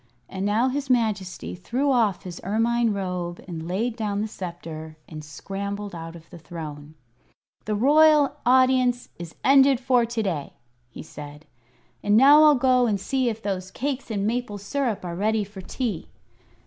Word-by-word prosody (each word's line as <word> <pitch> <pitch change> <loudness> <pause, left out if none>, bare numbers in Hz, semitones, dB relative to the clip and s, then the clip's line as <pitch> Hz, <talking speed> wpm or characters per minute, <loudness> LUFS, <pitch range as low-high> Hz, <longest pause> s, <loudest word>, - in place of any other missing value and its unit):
And 190 +1 -3
now 225 +5 +2
his 280 +1 -3
Majesty 215 -7 -1
threw 250 +10 -1
off 220 -7 +1
his 180 -2 -8
ermine 230 +3 +1
robe 180 -3 -3
and 165 -2 -6
laid 220 +6 -1
down 210 -3 -2
the 215 - -1
sceptre 165 -5 -8
and 155 -1 -9
scrambled 200 +6 -6
out 165 0 -7
of 165 -1 -13
the 175 - -11
throne. 155 -2 -9 0.7
"The 210 - -1
royal 295 +4 +5
audience 255 -1 +3
is 170 -1 -8
ended 270 -1 +5
for 250 -2 +2
to 230 -1 -2
day," 165 -8 -3 0.4
he - - -10
said, 150 0 -11 0.6
"and 205 +1 +3
now 285 +5 +8
I'll 305 -1 +7
go 255 -1 +3
and 205 -3 0
see 260 +4 0
if 225 0 -6
those 190 -2 -3
cakes 270 +5 -4
and 205 -3 -1
maple 230 -1 -2
syrup 210 -1 -2
are 175 - -4
ready 215 +3 +1
for 200 -1 -10
tea. 215 -2 -4
210 Hz, 165 wpm, -24 LUFS, 180-250 Hz, 0.7 s, now